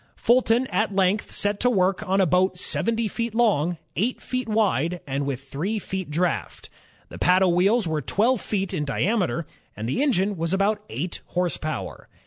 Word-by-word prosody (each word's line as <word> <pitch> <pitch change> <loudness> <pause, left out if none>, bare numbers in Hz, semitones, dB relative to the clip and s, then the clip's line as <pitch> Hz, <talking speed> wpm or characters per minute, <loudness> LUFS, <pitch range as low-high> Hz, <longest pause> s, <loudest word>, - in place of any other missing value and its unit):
Fulton 240 0 +3
at 215 -2 0
length 195 +2 +1
set 205 0 0
to 250 - +3
work 190 -4 +1
on 195 +1 +2
a 190 - +5
boat 180 +2 +2
seventy 230 +4 0
feet 230 +2 -3
long, 180 -8 +2 0.2
eight 230 +7 0
feet 255 -2 -4
wide, 180 -6 +1
and 140 0 -2
with 135 -1 -3
three 160 +11 -3
feet 190 -4 -5
draft. 155 - -2 0.4
The - - -10
paddle 180 0 +4
wheels 200 +4 +3
were 155 -2 -1
twelve 225 - +1
feet 195 -2 -2
in 160 -5 -1
diameter, 170 - 0 0.3
and 110 +2 -4
the 130 - -1
engine 205 -8 +1
was 165 +3 0
about 205 +2 +1
eight 170 +9 -4
horse 180 -1 0
power. 155 0 -5
190 Hz, 175 wpm, -24 LUFS, 170-220 Hz, 0.4 s, a